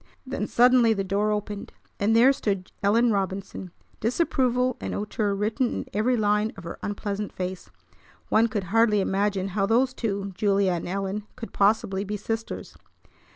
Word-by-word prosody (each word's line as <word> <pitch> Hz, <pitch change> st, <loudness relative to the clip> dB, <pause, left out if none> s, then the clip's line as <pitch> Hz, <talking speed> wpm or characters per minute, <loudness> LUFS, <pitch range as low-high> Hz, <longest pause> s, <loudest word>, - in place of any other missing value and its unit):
Then 255 Hz, -5 st, -3 dB
suddenly 245 Hz, -1 st, +5 dB
the 195 Hz, -2 st, -2 dB
door 200 Hz, +3 st, 0 dB
opened, 210 Hz, -1 st, -4 dB, 0.3 s
and 215 Hz, +2 st, +2 dB
there 250 Hz, +4 st, +6 dB
stood 195 Hz, -7 st, -3 dB
Ellen 225 Hz, +4 st, +3 dB
Robinson, 195 Hz, -1 st, -3 dB, 0.3 s
disapproval 250 Hz, -1 st, +1 dB
and -, -, -4 dB
hauteur 210 Hz, -1 st, -1 dB
written 215 Hz, +5 st, 0 dB
in -, -, -4 dB
every 240 Hz, +4 st, +2 dB
line 210 Hz, 0 st, +1 dB
of 195 Hz, -, -9 dB
her 170 Hz, -, -7 dB
unpleasant 205 Hz, 0 st, -3 dB
face! 185 Hz, 0 st, -5 dB, 0.6 s
One 225 Hz, +2 st, +4 dB
could 210 Hz, -3 st, -2 dB
hardly 225 Hz, -2 st, +4 dB
imagine 195 Hz, 0 st, 0 dB
how 195 Hz, +1 st, 0 dB
those 250 Hz, +4 st, +2 dB
two, 200 Hz, -5 st, -3 dB
Julia 195 Hz, 0 st, +2 dB
and 170 Hz, -2 st, -3 dB
Ellen, 195 Hz, +3 st, -3 dB
could 235 Hz, -2 st, -8 dB
possibly 200 Hz, -1 st, +2 dB
be 210 Hz, +1 st, -4 dB
sisters. 225 Hz, +2 st, -5 dB
210 Hz, 155 wpm, -25 LUFS, 195-230 Hz, 0.6 s, there